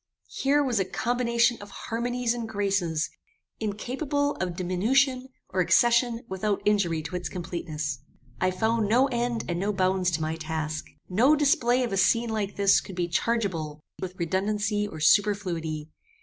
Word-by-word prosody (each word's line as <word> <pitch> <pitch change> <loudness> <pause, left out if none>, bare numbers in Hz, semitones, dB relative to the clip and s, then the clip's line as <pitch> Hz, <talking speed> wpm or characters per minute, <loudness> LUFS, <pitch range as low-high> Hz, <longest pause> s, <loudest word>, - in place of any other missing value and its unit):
Here 285 +2 +3
was 245 -6 0
a 190 - +1
combination 235 +1 +1
of 205 - -10
harmonies 240 +1 -2
and 235 -2 -5
graces, 195 -7 0 0.5
incapable 270 +7 -1
of 180 -2 -2
diminution 255 +9 +1 0.2
or 185 - -2
accession 235 +4 +3
without 200 +1 -1
injury 180 -7 +2
to 180 - -6
its 180 0 -3
completeness. 155 -6 -4 0.4
"I 185 - +2
found 220 +3 0
no 250 +5 +5
end 240 -2 -1
and 175 -1 -2
no 200 +3 0
bounds 185 -1 +1
to - - -7
my 160 +1 -2
task. 155 -1 -4 0.2
No 245 +11 +4
display 255 -4 +3
of 235 - -2
a - - 0
scene 230 +5 +3
like 205 -2 -2
this 200 -1 +4
could 190 - -9
be 175 -1 -1
chargeable 165 -7 -1 0.2
with 185 -1 -5
redundancy 205 +4 0
or 160 - -8
superfluity. 165 -5 +1
205 Hz, 155 wpm, -27 LUFS, 175-235 Hz, 0.5 s, no